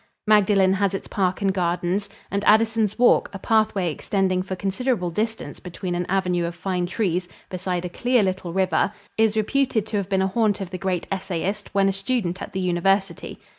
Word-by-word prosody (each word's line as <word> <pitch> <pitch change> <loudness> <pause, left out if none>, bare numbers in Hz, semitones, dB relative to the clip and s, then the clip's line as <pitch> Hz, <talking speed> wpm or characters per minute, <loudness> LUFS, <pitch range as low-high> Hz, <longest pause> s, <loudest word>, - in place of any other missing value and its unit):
Magdalen 200 -3 +4
has 195 0 +1
its - - -6
park 190 0 -1
and 195 -1 +2
gardens, 180 +2 -1 0.2
and 200 0 -1
Addison's 220 -1 +3
Walk 245 0 +4
a - - -4
pathway 210 -4 +1
extending 185 +3 0
for 185 0 -4
considerable 195 0 -1
distance 220 +5 -3
between 180 0 -5
an 175 0 -2
avenue 180 -2 +1
of 170 0 -4
fine 180 -1 -2
trees 180 -3 -1 0.2
beside 180 -1 -2
a - - -3
clear 245 +5 +2
little 185 -2 -2
river 190 +2 +1 0.3
is 220 -1 +3
reputed 230 0 +1
to 220 -1 -3
have 200 -1 -2
been 190 -1 +2
a - - +2
haunt 215 +1 +1
of 190 -2 -6
the 185 - -5
great 185 -1 -1
essayist 195 +2 -3
when 195 -1 +4
a 195 - +1
student 195 -2 -2
at - - -6
the 190 - -3
University. 185 0 0
195 Hz, 190 wpm, -23 LUFS, 180-210 Hz, 0.3 s, Magdalen